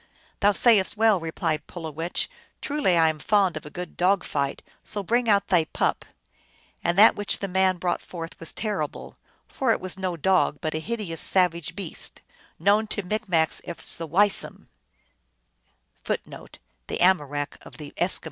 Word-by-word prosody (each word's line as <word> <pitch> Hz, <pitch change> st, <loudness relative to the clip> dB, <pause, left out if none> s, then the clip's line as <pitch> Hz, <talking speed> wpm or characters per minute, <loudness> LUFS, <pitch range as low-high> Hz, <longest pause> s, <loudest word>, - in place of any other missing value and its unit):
" -, -, -34 dB
Thou 205 Hz, 0 st, +4 dB
sayest 210 Hz, -1 st, +3 dB
well," 220 Hz, -3 st, +4 dB
replied 160 Hz, -1 st, -3 dB
Pulowech; 165 Hz, 0 st, -3 dB, 0.2 s
" -, -, -36 dB
truly 280 Hz, -, +1 dB
I 165 Hz, -1 st, +5 dB
am 155 Hz, -1 st, -1 dB
fond 195 Hz, -1 st, +2 dB
of 155 Hz, -1 st, -7 dB
a -, -, -8 dB
good 175 Hz, +3 st, -8 dB
dog 185 Hz, +1 st, +2 dB
fight, 140 Hz, -2 st, -3 dB, 0.2 s
so 205 Hz, -2 st, -3 dB
bring 235 Hz, +4 st, +1 dB
out 200 Hz, -1 st, +3 dB
thy 175 Hz, -4 st, +3 dB
pup! -, -, -1 dB, 0.4 s
" -, -, -34 dB
And 170 Hz, +1 st, 0 dB
that 215 Hz, +3 st, +8 dB
which 205 Hz, 0 st, 0 dB
the 200 Hz, -, -4 dB
man 190 Hz, 0 st, +2 dB
brought 175 Hz, 0 st, -1 dB
forth 165 Hz, -2 st, -8 dB
was 165 Hz, -, -7 dB
terrible; 200 Hz, -9 st, -4 dB, 0.3 s
for 260 Hz, -4 st, 0 dB
it -, -, +1 dB
was 185 Hz, +1 st, -3 dB
no 185 Hz, -2 st, -2 dB
dog, 185 Hz, -2 st, +2 dB
but 155 Hz, -, -3 dB
a 155 Hz, -, -2 dB
hideous 195 Hz, -4 st, -2 dB
savage 170 Hz, -3 st, +2 dB
beast, 190 Hz, -5 st, -1 dB, 0.4 s
known 205 Hz, +5 st, +2 dB
to 205 Hz, -1 st, -3 dB
Micmacs 180 Hz, -5 st, 0 dB
as 170 Hz, -, -2 dB
the 165 Hz, -, -4 dB
Weisum. 195 Hz, +5 st, +2 dB
185 Hz, 155 wpm, -25 LUFS, 165-205 Hz, 0.4 s, that